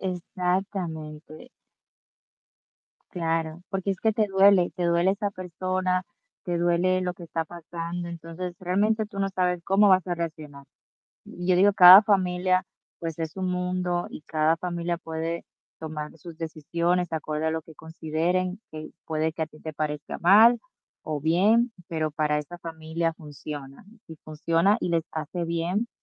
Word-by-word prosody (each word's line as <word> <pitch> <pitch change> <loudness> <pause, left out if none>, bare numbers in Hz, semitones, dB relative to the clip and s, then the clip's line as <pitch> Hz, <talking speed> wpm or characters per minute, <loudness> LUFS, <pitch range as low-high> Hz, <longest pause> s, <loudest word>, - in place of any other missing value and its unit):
exactamente. 180 -1 -4 1.6
Claro, 165 -1 -2
porque 195 0 -2
es 190 - -3
que 220 - +2
te 215 -1 +2
duele, 195 -2 +5
te 180 - -2
duele 170 +2 +3
esa 200 +1 -1
persona, 185 0 -2 0.4
te 175 -1 -1
duele 175 +2 +2
lo 180 -1 -1
que 175 -1 -11
está 165 0 -3
pasando, 170 +1 -6
entonces 170 +1 -6
realmente 205 +5 +1
tú 205 -1 -10
no 195 0 +1
sabes 180 -2 0
cómo 200 +1 +4
vas 185 -2 +4
a 175 - -1
reaccionar. 155 -4 -6 0.6
Y 175 - -8
yo 180 0 +4
digo, 195 +3 +5
cada 185 +1 +11
familia, 185 -3 +1 0.3
pues, 165 -1 -5
es 160 +2 -4
un 185 -1 -1
mundo, 180 -1 -1
y - - -10
cada 155 +1 +1
familia 175 0 -3
puede 165 0 -4 0.3
tomar 155 -1 -6
sus 165 0 -12
decisiones 170 +2 -1
acorde 155 0 -2
a 160 - +1
lo 160 0 -2
que 160 0 -16
consideren, 165 +4 -2
que 155 0 -7 0.2
puede 160 0 -1
que 160 0 -3
a - - -2
ti 155 0 -17
te 155 0 -7
parezca 150 -1 -4
mal 220 +7 +6 0.4
o 155 -3 -3
bien, 205 - +3 0.2
pero, 160 -3 -1
para 150 0 0
esta 160 +4 -8
familia 165 0 -3
funciona. 145 -1 -9 0.2
Si 160 - -9
funciona 165 +5 +2
y - - -2
les 165 -1 +1
hace 160 +3 -4
bien, 170 +7 -1
170 Hz, 155 wpm, -26 LUFS, 160-185 Hz, 1.6 s, cada